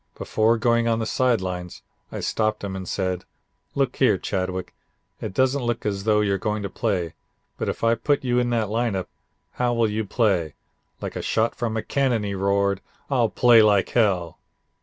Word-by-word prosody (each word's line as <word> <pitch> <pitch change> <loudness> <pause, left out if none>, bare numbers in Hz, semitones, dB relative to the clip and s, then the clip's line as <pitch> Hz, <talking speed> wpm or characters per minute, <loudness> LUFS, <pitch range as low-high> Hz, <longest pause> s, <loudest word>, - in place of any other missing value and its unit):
Before 110 +2 +2
going 115 0 +2
on 115 -1 +2
the 110 - -2
side 120 -1 +1
lines 90 -1 -5 0.3
I - - -5
stopped 110 -1 -1
him 95 -1 -4
and 95 -1 -6
said: 95 -2 -2 0.5
'Look - - 0
here, - - +4
Chadwick. 95 -1 -3 0.5
It - - -4
doesn't 130 +6 +1
look 120 -1 -2
as 100 -1 -2
though 105 -1 +3
you're 100 -2 +1
going 105 +1 -2
to 100 - -4
play, 95 -8 -1 0.5
but - - -1
if - - -5
I 115 0 +4
put 140 +5 0
you 125 -1 +2
in 120 0 +1
that 115 -3 0
lineup 110 -4 -1 0.5
how 120 -1 0
will 115 -1 +3
you 110 +1 -1
play?' 95 -7 0 0.5
Like - - -5
a - - -3
shot 110 +1 +1
from 115 -2 -2
a 110 - -2
cannon 130 -6 +1
he 100 -1 -3
roared: 100 0 +1 0.3
'I'll 120 -4 +3
play 120 -1 +6
like 105 -2 +3
hell.' 95 -8 +1
110 Hz, 190 wpm, -24 LUFS, 95-115 Hz, 0.5 s, play